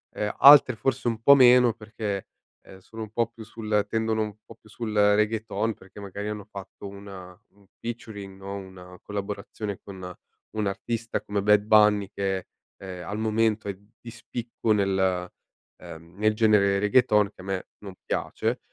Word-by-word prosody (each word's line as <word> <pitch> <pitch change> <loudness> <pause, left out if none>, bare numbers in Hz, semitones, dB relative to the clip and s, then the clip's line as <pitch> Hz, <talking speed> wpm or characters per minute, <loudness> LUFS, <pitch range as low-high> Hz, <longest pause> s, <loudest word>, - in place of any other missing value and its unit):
Ehm, 105 0 -2
altre 140 -3 +9
forse 125 +2 -1
un 115 -1 -1
po' 140 +5 +8
meno, 125 -3 +6
perché, 105 -3 -5 0.4
ehm, 95 - -14
sono 110 +4 -9
un 110 - -10
po' 115 0 0
più 115 -1 -12
sul 105 -2 -1
tendono 110 0 0
un 105 -1 -6
po' - - -14
più 110 - -22
sul 115 0 -5
Reggaeton, 105 +1 +1
perché 95 +2 -15
magari 100 +1 -6
hanno 105 -2 -6
fatto 100 0 -9
una 95 -2 -11
un 100 0 -26
featuring 105 -4 -7
no, 100 +1 -7
una 95 -2 -11
collaborazione 100 0 -5
con 95 -3 -9 0.4
un 105 -1 -1
artista 115 +3 -3
come 100 -1 -3
Bad 105 0 +5
Bunny, 105 -2 +4
che, 95 -2 -2 0.3
ehm, 90 -2 -8
al 105 +1 -4
momento 110 -1 +1
è 100 - -5 0.2
di 120 - -9
spicco 115 -1 -3
nel, 95 -3 0 0.5
ehm, 85 +2 -12
nel 110 +1 +2
genere 105 -3 +3
Reggaeton, 105 0 +3
che - - -31
a - - -12
me 95 -1 -3
non 100 -2 -10
piace. - - -2
105 Hz, 165 wpm, -26 LUFS, 100-110 Hz, 0.5 s, altre